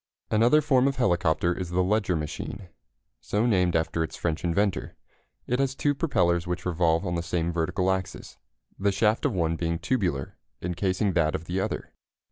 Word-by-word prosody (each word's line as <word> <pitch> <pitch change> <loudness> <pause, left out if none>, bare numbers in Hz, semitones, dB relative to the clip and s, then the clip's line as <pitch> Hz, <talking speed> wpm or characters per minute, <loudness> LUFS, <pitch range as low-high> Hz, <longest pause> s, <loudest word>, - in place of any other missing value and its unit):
Another 120 +8 +5
form 135 -3 +3
of 135 - 0
helicopter 85 -7 +2
is 90 -2 -4
the 90 +1 +1
Leger 100 -1 +1
machine, 80 +4 -5 0.5
so 105 +3 0
named 90 -7 +2
after 80 0 0
its 80 - -6
French 80 -2 -2
inventor. 95 +3 0 0.5
It 125 +2 -1
has 135 -1 0
two 145 +1 +1
propellers 90 - +1
which 90 0 -3
revolve 85 -2 +1
on 85 - -2
the 85 - -1
same 85 0 -1
vertical 90 +3 0
axis, 95 -1 -5 0.4
the 100 +1 +2
shaft 105 +3 +1
of - - +1
one 80 -3 0
being 85 0 -1
tubular, 90 - -2 0.2
encasing 95 +2 -1
that 80 -2 +2
of 80 - -5
the 90 +3 -2
other. 95 - -3
90 Hz, 175 wpm, -26 LUFS, 85-105 Hz, 0.5 s, Another